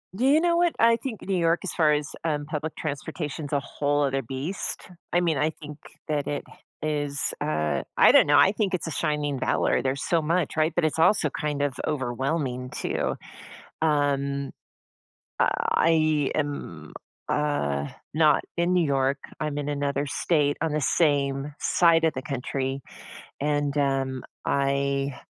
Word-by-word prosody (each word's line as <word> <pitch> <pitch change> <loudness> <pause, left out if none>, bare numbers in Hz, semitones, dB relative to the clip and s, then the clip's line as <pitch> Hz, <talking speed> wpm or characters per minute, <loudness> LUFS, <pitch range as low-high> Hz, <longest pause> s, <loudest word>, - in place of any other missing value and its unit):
Do 240 +6 0
you 290 +3 +6
know 340 0 +2
what, 345 -1 +3
I 230 0 +6
think 230 -3 -6
New 195 -1 -1
York, 170 0 +2
as 195 - -4
far 155 -3 +3
as, 150 0 0
um, 150 -3 -1
public 155 +1 -4
transportation's 150 0 -4
a 145 - +3
whole 145 +1 0
other 135 -1 0
beast. 135 - -5 0.2
I 175 - +3
mean, 165 -4 +1
I 150 +3 +2
think 150 -2 -10 0.3
that 150 -2 -1
it 145 - -2 0.4
is, 145 -2 -1
uh, 75 - 0 0.2
I - - +8
don't - - +6
know, 145 0 +5
I 190 - +6
think 200 -2 -1
it's 175 - -4
a - - -3
shining 150 -3 -1
valor, 125 - +1
there's 135 +2 -2
so 170 -2 +2
much, 165 +1 0
right, 155 +1 +3
but 175 - +2
it's 155 +1 -1
also 165 -1 +4
kind 150 -1 -2
of 145 -2 0
overwhelming 130 -1 -2
too, - - -2 0.7
um, 140 -2 +1 0.9
I 155 -3 +2
am, 140 - -4 0.4
uh, 70 - 0 0.3
not 155 -2 +4
in 175 +1 +1
New 180 -2 +3
York, 135 0 +1 0.2
I'm 150 -1 -2
in 145 0 -3
another 145 0 -1
state 145 0 +1
on 160 +1 0
the 155 - 0
same 140 -2 +1
side 165 -2 +3
of 160 - +2
the 130 - -4
country, 135 -1 -3 0.6
and, 145 -1 0
um, 135 -2 0 0.2
I 140 -1 0
145 Hz, 160 wpm, -26 LUFS, 140-160 Hz, 0.9 s, I